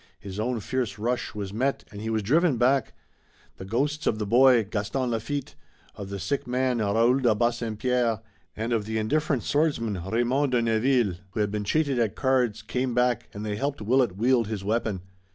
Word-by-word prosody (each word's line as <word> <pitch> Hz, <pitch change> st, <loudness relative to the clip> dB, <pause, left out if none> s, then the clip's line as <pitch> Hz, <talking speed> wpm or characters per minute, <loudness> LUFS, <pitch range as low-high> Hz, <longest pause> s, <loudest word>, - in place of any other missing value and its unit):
His 100 Hz, +1 st, -7 dB
own 120 Hz, +1 st, -1 dB
fierce 125 Hz, -1 st, -2 dB
rush 120 Hz, +2 st, -2 dB
was 100 Hz, -2 st, -5 dB
met 130 Hz, +5 st, 0 dB
and 100 Hz, -, -8 dB
he 110 Hz, -, -3 dB
was 110 Hz, -1 st, 0 dB
driven 150 Hz, -, +3 dB
back. 130 Hz, +1 st, +2 dB, 0.6 s
The 95 Hz, -, -8 dB
ghosts 145 Hz, +9 st, -1 dB
of 110 Hz, -, +2 dB
the 105 Hz, -, -2 dB
boy, 120 Hz, +2 st, +5 dB
Gaston 105 Hz, +5 st, -2 dB
Lafitte, 130 Hz, +5 st, -3 dB, 0.4 s
of 100 Hz, -1 st, -8 dB
the 100 Hz, -, -4 dB
sick 100 Hz, +11 st, -2 dB
man 125 Hz, -1 st, 0 dB
Raoul 115 Hz, +5 st, +3 dB
de 120 Hz, -5 st, +3 dB
Bassempierre, 120 Hz, 0 st, 0 dB, 0.4 s
and 115 Hz, +2 st, -1 dB
of 110 Hz, -3 st, 0 dB
the 110 Hz, +1 st, -2 dB
indifferent 140 Hz, +4 st, 0 dB
swordsman, 115 Hz, -, 0 dB
Raymond 120 Hz, +7 st, 0 dB
de 120 Hz, -, +3 dB
Neville 115 Hz, -3 st, +2 dB, 0.2 s
who -, -, -3 dB
had 105 Hz, -1 st, 0 dB
been 105 Hz, 0 st, -2 dB
cheated 140 Hz, +1 st, +1 dB
at 110 Hz, -4 st, 0 dB
cards, 125 Hz, -5 st, +1 dB
came 125 Hz, +2 st, -2 dB
back, 125 Hz, -1 st, +1 dB
and 105 Hz, +1 st, -6 dB
they 105 Hz, -1 st, -2 dB
helped 140 Hz, +4 st, -2 dB
Willet 115 Hz, -2 st, +1 dB
wield 120 Hz, 0 st, +2 dB
his 105 Hz, -3 st, -4 dB
weapon. 105 Hz, -3 st, -1 dB
115 Hz, 190 wpm, -26 LUFS, 105-130 Hz, 0.6 s, boy